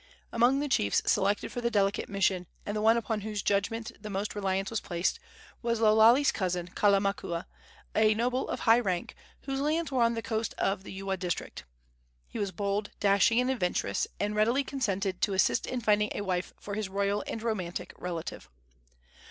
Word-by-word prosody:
Among 245 +4 +3
the 295 - -1
chiefs 100 - +2
selected 200 +2 +1
for 245 - -4
the 235 - +1
delicate 200 -3 +1
mission, 190 -2 +1 0.2
and 205 - -3
the 210 - -1
one 225 +2 +5
upon 220 -2 -2
whose 210 -1 -4
judgment 220 +3 0
the 210 - -7
most 200 +1 -3
reliance 195 -1 -1
was 225 - -1
placed, 175 - -1 0.4
was 235 -1 0
Lo 215 -1 +5
Lale's 235 +6 +6
cousin, 180 -3 -2
Kalamakua, 195 -3 +1 0.5
a 215 0 +4
noble 250 +3 0
of - - -3
high 230 0 +5
rank, 185 -7 -2 0.3
whose 270 -1 -3
lands 310 +3 0
were 260 -2 +1
on 235 0 +3
the 230 - -4
coast 220 -3 -2
of 195 -1 0
the - - -9
Ewa 195 0 -3
district. 180 - -4 0.6
He - - -7
was 200 -2 -1
bold, 200 +2 -2
dashing 205 +4 +4
and 250 +1 +2
adventurous, 180 - 0
and 210 +1 -1
readily 235 +6 +3
consented 200 -9 -2
to 200 - +1
assist 190 - +2
in 250 -1 -3
finding 210 -1 +3
a - - -2
wife 185 -2 -2
for 205 - -7
his 210 -1 -2
royal 200 +1 0
and 225 - -4
romantic 190 -7 -3
relative. 170 -2 -5
210 Hz, 185 wpm, -29 LUFS, 195-230 Hz, 0.6 s, Lale's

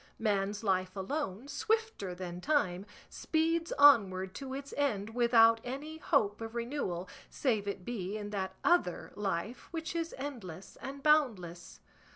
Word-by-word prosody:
Man's 205 -1 0
life 185 -2 0
alone, 225 +2 -3
swifter 445 - -1
than 175 -1 -6
time, 195 -9 +1 0.2
speeds 330 +1 0
onward 195 -10 +6
to 265 -1 -6
its 280 0 -7
end 225 -7 0
without 230 -1 +5
any 290 +6 -6
hope 220 -10 +1
of 225 +1 -6
renewal, 235 -8 -2 0.2
save 220 -7 0
it 195 -2 -4
be 210 -4 -3
in 205 -1 -6
that 190 -2 -3
other 350 - +2
life 205 +4 -3
which 325 -1 -4
is 330 0 -2
endless 215 - -7
and 275 +1 -7
boundless. 210 - +1
225 Hz, 140 wpm, -32 LUFS, 190-285 Hz, 0.2 s, onward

